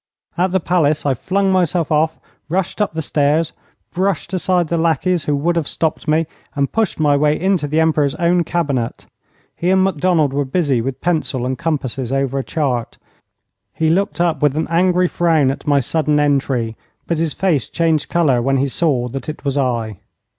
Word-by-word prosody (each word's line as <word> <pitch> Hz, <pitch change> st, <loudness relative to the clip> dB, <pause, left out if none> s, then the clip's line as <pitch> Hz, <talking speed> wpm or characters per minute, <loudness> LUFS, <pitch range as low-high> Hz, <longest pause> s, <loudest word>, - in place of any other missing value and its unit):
At 180 Hz, +1 st, +1 dB
the 190 Hz, -, +2 dB
palace 155 Hz, -4 st, +1 dB
I 140 Hz, -, +2 dB
flung 195 Hz, +9 st, 0 dB
myself 175 Hz, -3 st, +1 dB
off, 155 Hz, +1 st, +1 dB, 0.3 s
rushed 190 Hz, +4 st, -1 dB
up 205 Hz, -, 0 dB
the 160 Hz, -, -2 dB
stairs, 150 Hz, +3 st, +1 dB, 0.4 s
brushed 185 Hz, 0 st, -1 dB
aside 180 Hz, -2 st, +1 dB
the 170 Hz, -, -1 dB
lackeys 165 Hz, +1 st, +1 dB
who 145 Hz, -, +1 dB
would 165 Hz, +5 st, 0 dB
have 165 Hz, -4 st, -1 dB
stopped 160 Hz, -1 st, -2 dB
me, 155 Hz, +2 st, +2 dB, 0.3 s
and 140 Hz, -1 st, 0 dB
pushed 220 Hz, -7 st, -1 dB
my 145 Hz, -2 st, +3 dB
way 150 Hz, +1 st, +2 dB
into 185 Hz, -5 st, +1 dB
the 155 Hz, +2 st, 0 dB
Emperor's 155 Hz, -3 st, +2 dB
own 175 Hz, 0 st, +2 dB
cabinet. 145 Hz, -9 st, -2 dB, 0.5 s
He 175 Hz, -, -1 dB
and 190 Hz, 0 st, +4 dB
Macdonald 165 Hz, -5 st, +1 dB
were 145 Hz, +1 st, +1 dB
busy 135 Hz, -3 st, 0 dB
with 130 Hz, +2 st, -4 dB
pencil 155 Hz, -7 st, -1 dB
and 130 Hz, +1 st, -1 dB
compasses 130 Hz, -4 st, -3 dB
over 135 Hz, 0 st, 0 dB
a -, -, -3 dB
chart. 130 Hz, -7 st, -2 dB, 0.8 s
He 160 Hz, 0 st, +1 dB
looked 195 Hz, +2 st, 0 dB
up 170 Hz, -5 st, +1 dB
with 145 Hz, -1 st, +2 dB
an 160 Hz, -, -1 dB
angry 180 Hz, +1 st, +3 dB
frown 160 Hz, -6 st, +2 dB
at 135 Hz, -, -8 dB
my 145 Hz, -1 st, +4 dB
sudden 150 Hz, +3 st, 0 dB
entry, 135 Hz, -6 st, 0 dB, 0.3 s
but 165 Hz, -2 st, -1 dB
his 165 Hz, -2 st, 0 dB
face 170 Hz, -10 st, 0 dB
changed 160 Hz, -3 st, 0 dB
colour 145 Hz, -8 st, +2 dB
when 135 Hz, +2 st, +1 dB
he 135 Hz, +1 st, 0 dB
saw 130 Hz, -5 st, 0 dB
that 135 Hz, +5 st, -6 dB
it 155 Hz, -, -8 dB
was 140 Hz, -1 st, 0 dB
I. 120 Hz, -7 st, -1 dB
155 Hz, 190 wpm, -18 LUFS, 140-175 Hz, 0.8 s, and